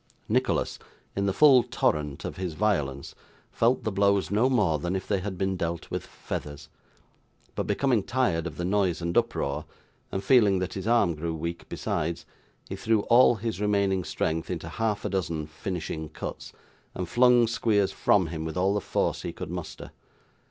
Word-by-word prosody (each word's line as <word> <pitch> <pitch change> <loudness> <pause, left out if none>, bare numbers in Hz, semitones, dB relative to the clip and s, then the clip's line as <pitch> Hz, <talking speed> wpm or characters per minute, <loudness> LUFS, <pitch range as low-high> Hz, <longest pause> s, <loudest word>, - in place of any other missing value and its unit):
Nicholas, - - 0 0.4
in 100 0 0
the - - +2
full 140 -2 +7
torrent 75 -10 -1
of - - -5
his 90 -4 -4
violence, 75 -11 -1 0.4
felt 120 +3 +2
the 110 - -1
blows 100 0 +2
no 110 +6 +3
more 95 - +2
than 90 +5 -2
if 95 - -4
they 100 -2 +1
had 95 0 -5
been 95 +1 0
dealt 85 -1 -4
with - - -2
feathers; 75 0 -7 0.8
but, - - -3
becoming 130 -6 +2
tired 95 -8 0
of 80 - -8
the 85 - -2
noise 95 -3 +1
and 85 0 -3
uproar, 70 +2 0 0.5
and 95 - -3
feeling 105 -4 +5
that 90 -1 -3
his 95 +2 -5
arm 115 -7 +3
grew 80 +1 -3
weak 85 +2 -5
besides, 85 +2 -2 0.4
he - - -5
threw 110 -1 +1
all 120 0 +7
his 110 -1 -4
remaining 100 -2 +1
strength 80 0 -2
into - - -4
half 110 -2 -2
a - - 0
dozen 85 -5 -2
finishing 80 -1 -5
cuts, - - -7 0.4
and 90 -1 -3
flung 120 +3 +5
Squeers 110 -3 +1
from 100 -3 +3
him 80 -1 -5
with 80 +1 -5
all 95 +2 +2
the 105 - 0
force - - -1
he - - -4
could - - -7
muster. - - -7
95 Hz, 180 wpm, -27 LUFS, 85-105 Hz, 0.8 s, full